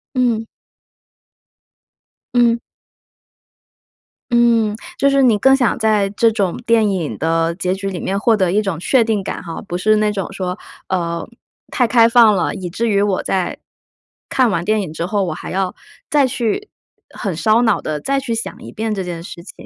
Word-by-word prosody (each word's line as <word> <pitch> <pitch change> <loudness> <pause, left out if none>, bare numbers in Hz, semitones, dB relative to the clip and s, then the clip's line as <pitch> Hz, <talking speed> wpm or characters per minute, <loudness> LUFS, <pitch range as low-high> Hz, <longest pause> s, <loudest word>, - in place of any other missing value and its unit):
嗯。 235 -3 +1 1.9
嗯。 235 -1 +4 1.7
嗯， 230 -3 +3 0.2
就 280 - +4
是 275 0 +3
你 230 -5 +4
更 270 +3 +5
想 250 -3 +1
在 215 -3 +2
这 225 +2 +3
种 200 -5 -1
电 225 -2 +4
影 175 -6 -3
的 165 +1 0
结 185 -1 -1
局 195 +1 -4
里 180 -3 -5
面 195 +1 -2
获 220 +1 +3
得 185 -3 +1
一 205 +3 +2
种 195 -6 -3
确 240 +7 +3
定 220 -3 -1
感 - - -5
哈， 165 -2 -6
不 175 - -4
是 215 +4 +3
那 210 0 +2
种 195 -2 -4
说， 185 -1 -4 0.3
呃， 170 -2 -2 0.4
太 245 -3 +2
开 230 -1 +5
放 230 -3 +6
了， 185 - 0
以 180 -2 -5
至 230 +7 -2
于 200 -2 +2
我 200 -2 0
在 185 -2 -1 0.7
看 255 -3 +3
完 170 -3 -1
电 215 +2 +1
影 160 -4 -7
之 165 +2 -3
后 205 0 0
我 175 -4 -2
还 155 - -8
要 190 -1 -1 0.4
再 285 -3 +4
去 255 - -2 0.4
很 195 -5 -4
烧 220 +7 +3
脑 220 -3 +2
地 150 -1 -3
再 275 - 0
去 250 -4 -3
想 225 - -5
一 - - -9
遍 220 0 -3
这 195 - -3
件 170 -2 -6
事 170 - -9
情。 175 - -13
210 Hz, 200 characters per minute, -18 LUFS, 185-230 Hz, 1.9 s, 放